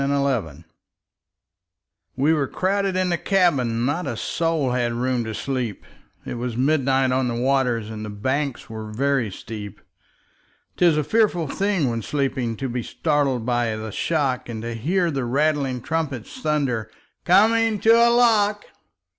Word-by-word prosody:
Field] 135 - -1 1.5
WE 145 +5 +3
were 145 -4 0
crowded 195 +3 0
in 185 0 +1
the 170 -1 0
cabin, 130 - +2
Not 150 +4 -1
a 120 - -3
soul 160 -4 0
had 120 -1 0
room 125 0 0
to 110 -1 -5
sleep; 125 -6 -3 0.4
It 120 - -5
was 120 -1 -3
midnight 135 -1 +2
on 130 0 +1
the 120 - -2
waters, 125 -3 0
And 110 -1 -6
the 105 - -5
banks 130 +6 -2
were 110 -1 -7
very 135 0 0
steep. 105 +1 -8 1.0
'Tis 170 -4 +4
a 150 - +1
fearful 190 -3 +1
thing 195 -1 0
when 115 -1 -2
sleeping 130 -4 -2
To 135 - -3
be 120 0 -3
startled 140 -3 0
by 120 -2 0
the 110 0 -6
shock, 135 -2 -1
And 110 -1 -5
to 115 0 -4
hear 170 - 0
the 135 -3 -2
rattling 135 0 0
trumpet 150 -7 -2
Thunder, 145 - -2 0.3
"Coming 225 0 +4
to 225 - +5
a 235 +1 +6
lock!" 215 -4 +3
135 Hz, 155 wpm, -23 LUFS, 120-165 Hz, 1.5 s, a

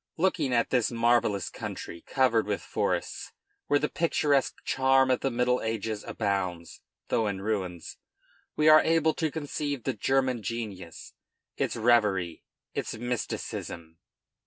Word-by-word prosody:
Looking 165 -6 +1
at 120 -1 +1
this 125 -4 +2
marvellous 115 -5 +2
country, 85 - -7
covered 120 -5 +2
with 105 -1 -2
forests, - - -2 0.3
where 145 - +4
the 150 - 0
picturesque 150 -5 +1
charm 130 0 +3
of 125 - +2
the 135 - 0
middle 125 0 +1
ages 110 -1 -3
abounds, 95 -5 -3 0.3
though 110 - +1
in 100 -2 -2
ruins, 95 -5 -3 0.6
we 155 - +2
are 155 0 +9
able 160 -1 +2
to 160 -2 -1
conceive 145 -3 -3
the 135 - -1
German 130 +1 +1
genius, 105 -7 -6 0.4
its - - -1
reverie, 105 -8 +2 0.3
its - - -3
mysticism. 95 -8 -5
120 Hz, 135 wpm, -28 LUFS, 100-135 Hz, 0.6 s, are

